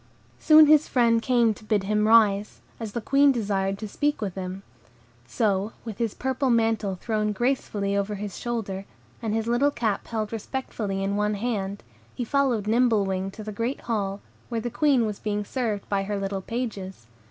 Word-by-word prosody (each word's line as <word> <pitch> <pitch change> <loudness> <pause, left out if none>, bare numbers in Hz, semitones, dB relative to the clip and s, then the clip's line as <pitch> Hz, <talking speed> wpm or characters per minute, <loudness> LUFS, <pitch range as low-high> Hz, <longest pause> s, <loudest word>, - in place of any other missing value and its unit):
Soon 310 0 +8
his 305 0 +5
friend 230 -2 +3
came 235 -2 +3
to 215 - -16
bid 210 -2 +1
him 210 +2 +1
rise, 210 -2 +4 0.2
as 220 -3 -5
the 235 - -2
Queen 275 +4 +4
desired 195 -5 -1
to 215 - -6
speak 290 +8 -1
with 200 -4 -3
him. 190 +1 -6 0.6
So, 205 - 0
with 220 -4 -7
his 230 -3 -1
purple 265 +1 -1
mantle 225 -4 +1
thrown 210 +2 -1
gracefully 205 -4 -1
over 200 +1 -1
his 205 -2 -6
shoulder, 205 -5 -4 0.4
and 220 -2 -1
his 225 -1 -1
little 240 +5 +3
cap 225 -7 -2
held 220 -1 -3
respectfully 215 -4 -3
in 200 +1 -1
his 210 0 0
hand, 200 -4 -3 0.3
he 245 - -2
followed 255 -5 +1
Nimble 225 -2 +3
Wing 190 0 -2
to 215 +2 -9
the 215 - -5
great 230 +6 -3
hall, 200 -3 -2 0.3
where 230 -2 -1
the 240 +1 -4
Queen 260 -1 +3
was 210 -2 -4
being 210 -1 -2
served 220 -4 -2
by 200 -1 0
her 205 +1 -3
little 195 0 -3
pages. 195 - -5
215 Hz, 185 wpm, -25 LUFS, 200-240 Hz, 0.6 s, Soon